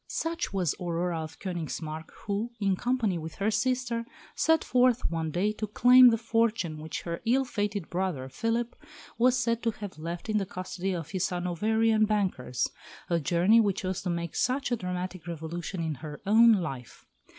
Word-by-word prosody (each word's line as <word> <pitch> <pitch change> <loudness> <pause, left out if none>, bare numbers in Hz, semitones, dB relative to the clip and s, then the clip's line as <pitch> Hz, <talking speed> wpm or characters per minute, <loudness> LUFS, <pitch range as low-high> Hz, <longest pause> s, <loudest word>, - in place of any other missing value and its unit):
Such 330 +1 -2
was 185 -6 0
Aurora 175 -1 -1
of 155 -1 -8
Königsmarck 160 -3 -5 0.2
who, 210 +3 -1
in 195 -2 +2
company 230 -5 0
with 160 0 -7
her 205 +2 0
sister, 240 +1 0 0.3
set 320 0 +3
forth 250 -1 +3
one 165 -1 -1
day 185 +7 +1
to 215 0 -4
claim 250 +4 +7
the 230 - +2
fortune 225 -8 0
which 155 +1 -5
her 170 -1 -4
ill 255 +4 +2
fated 205 -6 -2
brother, 175 -8 -2
Philip, 230 - -2 0.4
was 250 +1 +4
said 235 -1 0
to 230 - +1
have 205 -7 -7
left 170 +4 -5
in 215 -1 +1
the 195 - -3
custody 185 +1 -4
of 160 -3 -6
his 185 -1 0
Hanoverian 215 +5 +2
bankers 190 - 0 0.4
a 170 - +3
journey 175 +8 +4
which 200 -3 0
was 185 0 -2
to 185 - -3
make 170 -1 -3
such 255 +1 0
a - - +3
dramatic 180 -3 -5
revolution 170 +2 -4
in 160 -1 -1
her 150 +1 -8
own 225 +3 +7
life. 135 - -4
190 Hz, 175 wpm, -28 LUFS, 170-230 Hz, 0.4 s, claim